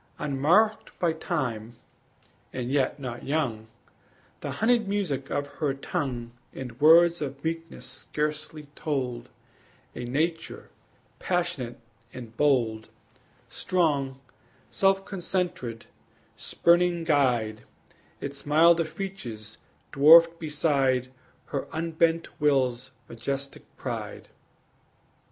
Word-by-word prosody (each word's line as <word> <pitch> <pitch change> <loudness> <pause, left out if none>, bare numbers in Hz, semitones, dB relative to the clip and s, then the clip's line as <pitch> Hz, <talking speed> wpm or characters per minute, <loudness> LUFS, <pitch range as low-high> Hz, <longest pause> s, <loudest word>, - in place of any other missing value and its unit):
Unmarked 160 +10 +2
by 170 -2 +1
time, 125 - -3 0.8
and 125 0 -4
yet 140 0 +1
not 125 -3 -6
young, 125 -7 -1 0.7
The - - -5
honeyed 230 -1 +2
music 180 -10 -2
of 145 - -1
her 140 -3 0
tongue 125 -4 -3 0.2
And 125 0 -8
words 170 +2 +6
of 140 -1 -5
meekness 165 -5 -4
scarcely 150 +3 -4
told 130 -7 -3 0.7
A 125 - -5
nature 160 +7 -2 0.5
passionate 175 -10 -2 0.3
and 115 -3 -10
bold, 115 -7 +1 0.6
Strong, 140 -7 0 0.5
self 195 0 +2
concentred, 175 - -3 0.5
spurning 175 0 +2
guide, 125 -9 +1 0.6
Its 140 0 -6
milder 165 +3 +5
features 125 - -7 0.3
dwarfed 165 +4 +7
beside 140 -5 +1 0.4
Her 140 - -2
unbent 165 0 0
will's 130 -3 +2 0.2
majestic 135 +4 -5
pride. - - -6
145 Hz, 90 wpm, -27 LUFS, 125-165 Hz, 0.8 s, dwarfed